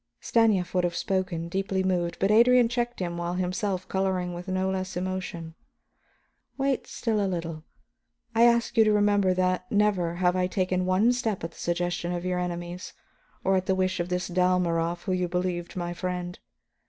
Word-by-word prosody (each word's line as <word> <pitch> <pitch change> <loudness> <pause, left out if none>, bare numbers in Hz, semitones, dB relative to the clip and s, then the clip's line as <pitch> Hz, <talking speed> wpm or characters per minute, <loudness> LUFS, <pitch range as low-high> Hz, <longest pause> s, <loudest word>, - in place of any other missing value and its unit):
'" - - -55
Stanief 210 -6 +2
would 180 -1 +2
have 175 -1 -1
spoken, 185 -3 -1
deeply 190 +1 -1
moved, 175 -2 0
but 195 +2 +2
Adrian 240 +2 +6
checked 240 0 -2
him 175 -2 -3
while 175 +1 -2
himself 185 +1 -2
coloring 190 -2 -1
with 175 +2 -7
no 185 0 0
less 185 -1 -3
emotion. 180 -3 -4 1.0
"Wait 270 -1 0
still 220 -3 -1
a 195 - 0
little. 165 -3 -4 0.7
I 230 +1 +5
ask 235 -1 +3
you 225 - +8
to 215 - +3
remember 205 -2 +3
that 185 0 0
never 200 -5 +2
have 180 0 +2
I 180 0 +1
taken 185 -1 0
one 200 +6 +4
step 225 -7 -2
at 165 - -4
the - - -17
suggestion 175 0 -1
of 175 0 -3
your 180 -1 0
enemies 175 +1 -5 0.5
or 190 0 +3
at 185 - -2
the 190 - +2
wish 185 0 0
of 175 +1 -2
this 180 0 -1
Dalmorov 175 -2 +1
whom 190 - -1
you 180 -1 0
believed 180 -1 -2
my 175 -1 -3
friend. 180 0 -4
185 Hz, 185 wpm, -27 LUFS, 175-195 Hz, 1.0 s, you